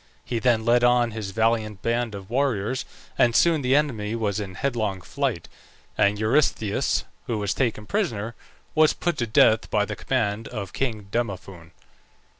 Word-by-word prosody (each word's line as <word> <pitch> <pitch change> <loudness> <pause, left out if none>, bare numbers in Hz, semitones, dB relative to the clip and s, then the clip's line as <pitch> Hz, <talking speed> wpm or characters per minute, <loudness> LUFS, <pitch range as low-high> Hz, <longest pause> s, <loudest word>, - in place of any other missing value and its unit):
He 120 - -2
then 115 -2 +2
led 120 +1 +4
on 120 -1 +4
his 110 -2 -5
valiant 110 -1 0
band 115 -2 0
of 95 -1 -9
warriors, 125 -1 0 0.3
and 120 -1 +4
soon 165 -3 +4
the 130 +1 +2
enemy 115 -8 0
was 105 -3 -1
in 95 -3 -6
headlong 110 -6 -1
flight; 130 - -2 0.5
and 100 +1 +3
Eurystheus, 110 -2 +1 0.2
who 115 - -1
was 100 -2 -1
taken 115 -5 -1
prisoner, 115 - -2 0.4
was 155 0 +5
put 175 -1 -1
to 120 - 0
death 110 +1 +4
by 105 -1 +2
the 105 - -5
command 110 -4 -1
of 105 -6 -6
king 110 -6 -2
Demophoon. 95 -7 -4
115 Hz, 160 wpm, -24 LUFS, 105-125 Hz, 0.5 s, was